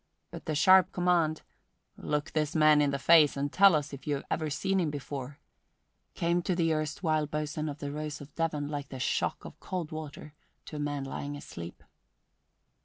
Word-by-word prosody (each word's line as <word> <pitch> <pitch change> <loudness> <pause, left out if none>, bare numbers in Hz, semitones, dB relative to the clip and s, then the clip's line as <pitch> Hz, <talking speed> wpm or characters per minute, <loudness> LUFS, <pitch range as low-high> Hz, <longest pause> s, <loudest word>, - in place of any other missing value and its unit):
But - - -9
the 155 - -2
sharp 185 +4 +6
command, 175 -3 +1 0.5
"Look 150 +1 -2
this 150 -1 -1
man 155 -1 +6
in 145 - +3
the 140 - -1
face 155 -1 +5
and 140 +1 -2
tell 195 -3 +7
us 150 -1 -2
if 140 +1 -9
you 145 - +1
have 140 - -5
ever 155 -1 -1
seen 190 +6 0
him 170 -4 +1
before," 140 -1 -6 0.8
came 170 +1 +1
to 180 +1 -1
the 165 -2 +2
erstwhile 155 0 -1
boatswain 150 +1 -3
of 145 - -6
the 145 -1 -5
Rose 150 +1 -5
of 145 0 -12
Devon 155 -3 -1
like 145 -2 -5
the 130 - -7
shock - - -1
of - - -10
cold 180 -4 -4
water 155 -1 -8 0.3
to 155 - -7
a - - -5
man 145 -1 -2
lying 145 +1 -5
asleep. 85 -11 -9
150 Hz, 190 wpm, -29 LUFS, 145-160 Hz, 0.8 s, tell